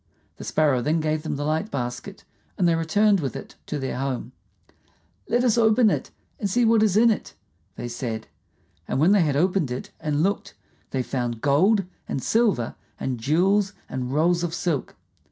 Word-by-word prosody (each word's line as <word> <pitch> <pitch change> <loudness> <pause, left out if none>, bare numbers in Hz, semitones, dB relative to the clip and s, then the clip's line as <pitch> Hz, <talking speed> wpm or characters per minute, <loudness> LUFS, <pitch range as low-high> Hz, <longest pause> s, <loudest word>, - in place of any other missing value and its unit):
The - - -8
Sparrow 145 -5 +2
then 155 +6 +1
gave 155 0 0
them 155 - -3
the 145 +1 -3
light 160 +7 -1
basket, 125 +9 -5 0.3
and 180 - +3
they 170 - +4
returned 195 +6 +3
with 135 -7 -3
it - - -8
to 150 - -3
their 135 -2 -3
home. 135 -2 -3 1.0
"Let 240 +2 +2
us 240 -2 +3
open 220 0 +5
and 200 - -5
see 240 +5 +2
what 225 -1 +4
is 210 -2 +3
in 230 +1 +6
it," 215 - -4 0.4
they 120 - -5
said. 115 -2 -4 0.6
And - - -1
when 165 +6 +5
they 205 -2 +5
had 150 -4 +1
opened 180 -1 +1
it 125 +1 -5
and 150 0 0
looked, 200 +2 -1 0.3
they 130 -1 -1
found 120 -3 -3
gold 185 +9 +3 0.2
and - - -1
silver 210 - +1 0.3
and 130 -3 -3
jewels 190 - +2
and 125 -1 -4
rolls 170 +4 +2
of 170 -1 -2
silk. 165 -8 -2
160 Hz, 180 wpm, -24 LUFS, 135-200 Hz, 1.0 s, in